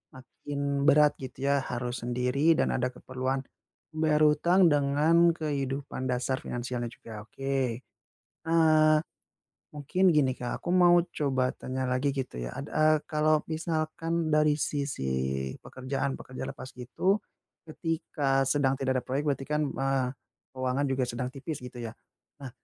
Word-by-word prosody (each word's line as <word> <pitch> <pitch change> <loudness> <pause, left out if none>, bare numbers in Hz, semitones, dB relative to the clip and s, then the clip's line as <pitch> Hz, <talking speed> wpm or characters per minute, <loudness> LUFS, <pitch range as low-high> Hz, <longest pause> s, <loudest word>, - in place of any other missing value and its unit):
makin 140 +2 -8 0.3
berat 150 0 +6
gitu 130 -1 -8
ya 140 - +4 0.2
harus 120 0 -3
sendiri 125 +2 -1 0.2
dan - - +3
ada 125 0 +1
keperluan 130 +1 -3 0.5
membayar 155 -1 +1
hutang 170 +5 +2
dengan 145 +3 +3 0.2
kehidupan 140 -4 -3
dasar 125 +1 0
finansialnya 120 0 -3
juga. 115 - -13
Oke. 130 0 -2 0.7
Eee, 155 -2 +5 0.8
mungkin 150 +6 -2
gini, 135 -3 +4
Kak, 125 - -3
aku - - -4
mau 175 -1 +6 0.2
coba 135 -3 +1
tanya 130 0 -4
lagi 130 +3 +1
gitu 130 - -4
ya - - -4
ad 140 - -4
eee, 155 0 +4
kalau 155 -1 +2
misalkan 160 0 -1
dari 150 0 +4
sisi 140 - -2 0.6
pekerjaan 135 +1 -3
pekerja 130 - -8
lepas 130 - -8
gitu, 185 - 0 0.5
ketika 155 -4 -1
sedang 135 -1 +2
tidak 130 -1 +1
ada - - -22
proyek 135 +3 -1
berarti 135 -1 -2
kan, 150 0 0
eee, 135 -2 0 0.5
keuangan 130 +2 0
juga 130 0 0
sedang 125 +1 -3
tipis 140 +3 -6
gitu 125 0 -9
ya. 115 - -5 0.5
Nah, 135 - -6
135 Hz, 140 wpm, -28 LUFS, 130-155 Hz, 0.8 s, berat